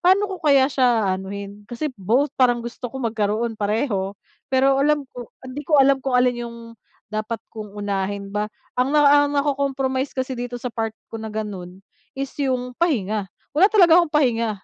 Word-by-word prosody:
pa'no 375 +3 +4
ko 380 - -5
kaya 275 -4 +4
siya 245 -5 +3
aanuhin. 200 +2 -6
Kasi 245 +5 -3
both 245 +10 +2
parang 245 -2 +3
gusto 240 +1 -6
ko 265 - -9
magkaroon 225 0 -1
pareho, 205 -2 -1 0.3
pero 270 +1 +3
alam 295 0 +2
ko 245 -2 -8 0.2
hindi 260 +2 -6
ko 305 - +5
alam 275 -1 +5
kung 265 -1 0
alin 245 -1 +2
yung 235 - -10 0.6
dapat 215 +1 -3
kong 210 -2 -8
unahin 200 0 -3
ba. 210 +1 -1 0.3
Ang 270 +4 +2
na, - - +6
ah, 290 0 +6
nako-compromise 275 -2 -1
kasi 260 0 -2
dito 245 -1 -4
sa 245 0 -5
part 225 -1 -3 0.2
ko 225 - -5
na 220 - -5
gano'n 195 -3 -6 0.3
is 275 0 -4
yung 255 -2 -1
pahinga, 215 - 0 0.2
wala 360 +7 +5
talaga 355 -6 +6
akong 335 -3 -2
pahinga. 235 -6 +2
245 Hz, 175 wpm, -22 LUFS, 215-275 Hz, 0.6 s, na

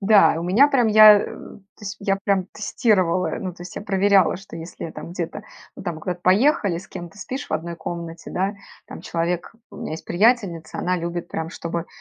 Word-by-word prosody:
Да, 200 -4 +5
у - - -4
меня 215 +12 +5
прям, 250 -5 +3
я, 215 -1 +9
э - - -3
то 200 +1 -13
есть 205 +1 -5
я 195 -1 +1
прям 195 -2 +1
тестировала, 185 -5 +1
ну, 185 -3 -4
то 175 - -11
есть 180 - -10
я - - -4
проверяла, 195 -2 +3
что 190 -3 -11
если 165 0 -7
там 165 - -9
где-то, 180 +4 -5 0.3
ну, - - -8
там 170 -4 -4
куда-то 180 +1 -4
поехали, 205 - +3
с 190 - -12
кем-то 175 +3 -9
спишь 260 +8 -5
в - - -6
1 170 +1 -3
комнате, 170 -1 -7
да. 195 +3 -1 0.3
Там - - -9
человек, 170 +1 -2 0.2
у - - -12
меня - - -5
есть 160 - -7
приятельница, 195 -4 +1
она 180 0 0
любит 170 0 -4
прям, 160 0 -4
чтобы 170 -1 -4
185 Hz, 205 wpm, -22 LUFS, 170-205 Hz, 0.3 s, я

